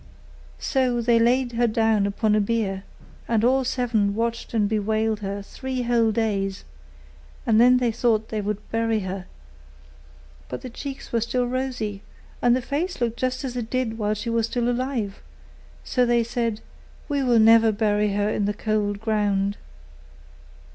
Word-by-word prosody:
So 255 -3 0
they 235 0 +3
laid 245 +2 +2
her 240 0 +2
down 220 -2 +2
upon 210 +1 +1
a 210 - +3
bier, 200 -3 -1 0.4
and 225 -2 +1
all 260 +2 +3
seven 230 -5 0
watched 230 +1 -2
and 215 -3 +2
bewailed 215 +1 0
her 200 -1 -4
three 260 +4 -4
whole 235 -2 +2
days; 200 -3 -1 0.8
and 225 -1 +4
then 250 +1 +6
they 245 -2 +1
thought 220 -1 +1
they 215 -1 -2
would 210 0 -4
bury 225 -1 +1
her: 190 0 -5 1.2
but 125 - -6
her 255 - -6
cheeks 270 +3 -7
were 230 - +2
still 245 +2 0
rosy; 245 -5 -3 0.4
and 245 0 +4
her 255 - -2
face 325 +8 -2
looked 235 -1 -1
just 255 +1 -1
as 255 -2 -4
it 235 -2 -4
did 245 -3 -2
while 210 0 0
she 230 +3 -4
was 230 +1 -1
alive; 245 -3 -1 0.6
so 250 - +1
they 240 -1 +3
said, 230 -2 -2 0.5
'We 285 -2 0
will 245 -3 +3
never 225 0 +6
bury 210 -1 +1
her 205 0 +1
in 210 -1 0
the 205 0 -1
cold 210 -1 -1
ground. 205 -2 0
225 Hz, 160 wpm, -24 LUFS, 210-245 Hz, 1.2 s, then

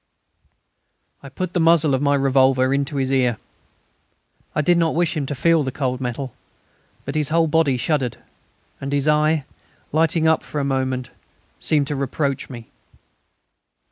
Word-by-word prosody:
I 140 - -10
put 180 +6 -5
the 180 - +1
muzzle 165 -3 +4
of 130 - +1
my 145 0 +2
revolver 130 -1 +3
into 140 +1 -1
his 135 -1 0
ear. 125 -4 +2 1.2
I 155 - +2
did 170 +3 +3
not 165 -2 +1
wish 170 -1 +1
him 145 -3 -2
to 145 - -3
feel 165 +4 +3
the 135 -2 -2
cold 130 -1 -2
metal; 125 0 -4 0.7
but 135 - -4
his 150 -1 0
whole 165 +1 +3
body 155 -4 +2
shuddered, 130 -2 -1 0.6
and 135 +1 -4
his 145 +1 +1
eye, 150 -1 +2 0.5
lighting 160 +1 +2
up 160 - +3
for 150 - -5
a - - -1
moment, 130 -2 -2 0.5
seemed 150 -2 +2
to 145 - -2
reproach 140 0 -2
me. 120 -4 -10
140 Hz, 160 wpm, -21 LUFS, 130-155 Hz, 1.2 s, muzzle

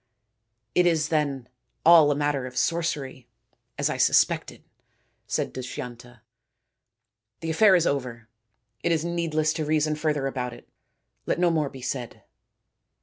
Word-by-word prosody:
" - - -53 0.3
It 180 0 +4
is, 160 -2 +1
then, 145 -5 -1 0.4
all 165 -3 +8
a 145 - +2
matter 145 -3 -1
of 125 0 -10
sorcery, 145 -7 -2 0.5
as - - +1
I - - -2
sus - - +5
pected," - - -7 0.7
said - - -2
Dushyanta. 120 -1 -8 0.6
" 110 -2 -60
The 165 0 -2
affair 190 +4 +5
is 170 -2 +3
over. 125 -6 -3 0.5
It 170 - 0
is 165 -1 0
needless 160 -3 0
to 155 - -3
reason 155 0 +1
further 150 -2 -1
about 125 -2 -3
it. 120 - -14 0.6
Let - - 0
no 175 0 +3
more 155 -3 0
be 130 -2 -11
said." 125 -2 -5
145 Hz, 150 wpm, -25 LUFS, 125-160 Hz, 0.7 s, all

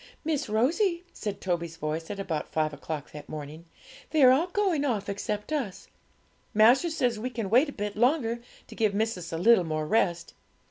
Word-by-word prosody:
'Miss 300 -6 -1
Rosie,' 340 - +1
said 205 -3 -5
Toby's 170 -3 -2
voice, 160 +1 -3
at 205 -1 -5
about 165 -6 -3
five 155 -1 0
o'clock 145 0 -6
that 150 -1 -10
morning, 155 +2 -7 0.4
'they 310 -3 +3
are 255 - +9
all 300 +7 +3
going 370 -5 +1
off 230 -8 -1
except 205 +5 -3
us. 245 -11 -3 0.7
Master 240 +10 +5
says 250 -9 0
we 250 +4 -3
can 225 -5 -4
wait 260 +6 +5
a - - -5
bit 205 -4 -4
longer, 240 0 +2 0.3
to - - -12
give 215 -3 +1
missis 200 -6 -2
a 165 - -2
little 215 +2 +5
more 155 -2 -2
rest. 170 -2 0
215 Hz, 185 wpm, -28 LUFS, 170-260 Hz, 0.7 s, are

